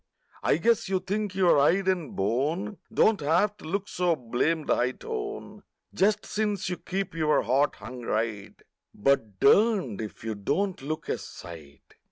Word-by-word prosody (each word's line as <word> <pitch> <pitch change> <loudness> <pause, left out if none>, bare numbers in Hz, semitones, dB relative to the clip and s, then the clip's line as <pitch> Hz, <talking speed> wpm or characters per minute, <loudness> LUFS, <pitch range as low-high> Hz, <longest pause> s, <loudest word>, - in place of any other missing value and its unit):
I - - +2
guess 225 +3 +2
you 190 -1 +1
think 200 +1 -3
your 180 -6 +4
hide 180 +7 +3
and 180 -6 -1
bone 150 - -1
Don't 220 -1 +3
have 170 +8 +2
to - - -13
look 195 +5 -2
so 175 -2 +1
blamed 150 +5 -1
high 125 +1 +2
tone 420 - -6 0.3
Just 210 +2 +2
since 210 -3 -1
you 180 - -3
keep 195 -1 -4
your 155 -2 +2
heart 135 +5 +2
hung 120 +4 -9
right,— 110 -3 -3 0.4
But 110 -5 +1
durned 195 - +3
if 110 0 -8
you 110 -1 -2
don't 150 - -1
look 155 +3 -4
a - - -1
sight. 75 -5 -12
165 Hz, 160 wpm, -27 LUFS, 120-200 Hz, 0.4 s, your